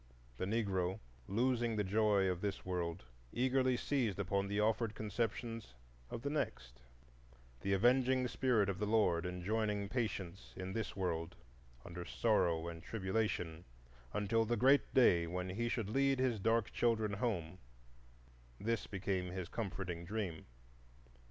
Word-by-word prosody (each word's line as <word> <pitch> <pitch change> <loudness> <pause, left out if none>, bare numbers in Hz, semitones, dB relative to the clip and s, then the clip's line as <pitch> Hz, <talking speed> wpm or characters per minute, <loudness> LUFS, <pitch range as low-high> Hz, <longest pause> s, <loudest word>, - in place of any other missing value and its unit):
The - - -1
Negro, 95 -4 0 0.3
losing 120 +1 +1
the 105 - +1
joy 100 0 +3
of 90 -1 -1
this 100 -2 -3
world, 85 -4 -2 0.3
eagerly 130 0 +2
seized 120 -9 0
upon 100 0 0
the 100 +1 -1
offered 110 0 +1
conceptions 115 - -3 0.3
of 115 - -6
the 140 - 0
next; 60 - -3 0.8
the 100 - 0
avenging 125 +4 +4
Spirit 120 -5 +2
of 100 -1 -2
the 105 - 0
Lord 90 -6 +3
enjoining 100 +3 -1
patience 100 -7 -3
in 95 0 -5
this 110 -4 -3
world, 85 -4 -2 0.5
under 85 0 -6
sorrow 85 -6 +1
and 85 -1 -6
tribulation 95 -5 -2 0.5
until 105 - +1
the 120 +2 0
Great 135 +5 +4
Day 85 -10 +5
when 90 +2 -3
He 115 +5 -1
should 110 -4 -2
lead 135 +2 +3
His 130 -4 +1
dark 115 +2 +2
children 110 -3 +1
home,—this - - -5
became 95 -2 -2
his 90 -1 -5
comforting 95 -5 -4
dream. 95 -3 -4
100 Hz, 135 wpm, -36 LUFS, 90-115 Hz, 0.8 s, Day